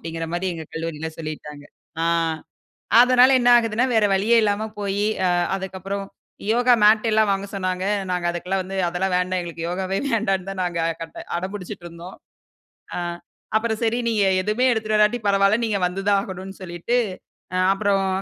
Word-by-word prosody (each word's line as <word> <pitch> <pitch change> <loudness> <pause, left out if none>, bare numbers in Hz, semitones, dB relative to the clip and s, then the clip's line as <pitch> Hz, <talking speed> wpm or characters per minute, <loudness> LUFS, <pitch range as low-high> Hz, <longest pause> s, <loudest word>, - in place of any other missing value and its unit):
அப்டீன்கற 165 0 -5
மாரி 175 +2 -2
எங்க 160 -1 -7
கல்லூரில 160 -1 -4
சொல்லிட்டாங்க. 150 -2 -7 0.4
ஆ - - +2 1.0
அதுனால 255 +1 +6
என்ன 245 - +3
ஆகுதுன்னா, 225 +1 +1
வேற 220 -1 +4
வழியே 215 +5 +3
இல்லாம 210 +1 0
போயி, 200 0 -1 0.2
அ - - +3 0.3
அதுக்கப்றம் 195 +1 -5 0.5
யோகா 245 +1 +4
மேட் 215 +2 +5
எல்லாம் 215 -1 +3
வாங்க 195 0 -2
சொன்னாங்க. 185 -1 -2 0.3
நாங்க 180 -1 -2
அதுக்கெல்லாம் 180 +2 -2
வந்து, 190 +1 -6
அதெல்லாம் 180 +2 -1
வேண்டாம். 180 0 -1
எங்களுக்கு 170 -1 -6
யோகாவே 190 +2 -2
வேண்டான்னு 195 -5 0
தான், 195 -1 -5
நாங்க 175 -1 -2 0.2
கட் 165 - -9 0.2
அடம்புடிச்சிட்டு 185 -1 -6
இருந்தோம். 170 +2 -11 0.8
அ, - - -2 0.6
அப்பறம் 220 0 0
சரி, 230 +1 +1
நீங்க 215 -3 +2 0.2
எதுவுமே 215 +6 0
எடுத்துட்டு 215 -2 0
வராட்டி 210 +3 +3
பரவால்ல. 195 +1 +3
நீங்க 215 -3 0
வந்து 180 +2 -3
தான் 200 -1 +4
ஆகணும்னு 190 0 -8
சொல்லீட்டு, 175 +6 -2 0.8
அப்பறம் 195 -1 +1
195 Hz, 155 wpm, -22 LUFS, 180-215 Hz, 1.0 s, அதுனால